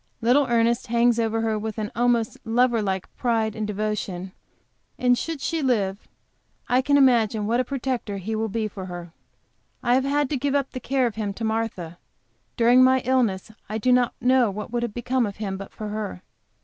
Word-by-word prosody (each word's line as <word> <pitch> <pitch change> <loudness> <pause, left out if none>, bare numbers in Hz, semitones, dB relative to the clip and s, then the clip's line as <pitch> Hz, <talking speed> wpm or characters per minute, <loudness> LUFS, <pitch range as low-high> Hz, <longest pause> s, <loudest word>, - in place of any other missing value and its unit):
Little 250 +4 +3
Ernest 235 +1 +1
hangs 235 0 +3
over 225 0 0
her 220 -1 0
with 220 0 -5
an 210 -1 -3
almost 235 -1 +1
lover 235 0 +2
like 190 -2 -3
pride 225 -3 0
and 215 -1 -3
devotion, 205 -3 -3 0.7
and 250 0 +3
should 325 +4 -4
she 325 +1 -1
live 210 -7 0 0.6
I 250 +1 +3
can 285 +2 +3
imagine 230 -6 +3
what 235 +3 +1
a - - +3
protector 250 -5 -3
he 210 +4 -4
will 220 0 -1
be 220 +1 -1
for 190 -2 -8
her. 175 -2 -8 0.7
I 240 - +3
have 260 +1 +3
had 285 +1 +1
to 285 - +1
give 280 +2 -1
up 275 -1 0
the 255 - -5
care 265 +1 0
of 230 -3 -3
him 205 -3 -3
to 230 - -6
Martha. 220 -7 -3 0.6
During 245 +2 +6
my 260 0 +4
illness 235 -6 0 0.2
I 215 - -2
do 250 +3 +1
not 250 -1 +3
know 255 -2 +3
what 210 +3 -6
would 240 0 -1
have 235 -3 -3
become 245 0 0
of 200 - -7
him 200 -2 -3
but 195 0 -8
for 215 -1 -6
her. 210 - -5
230 Hz, 200 wpm, -24 LUFS, 210-250 Hz, 0.7 s, During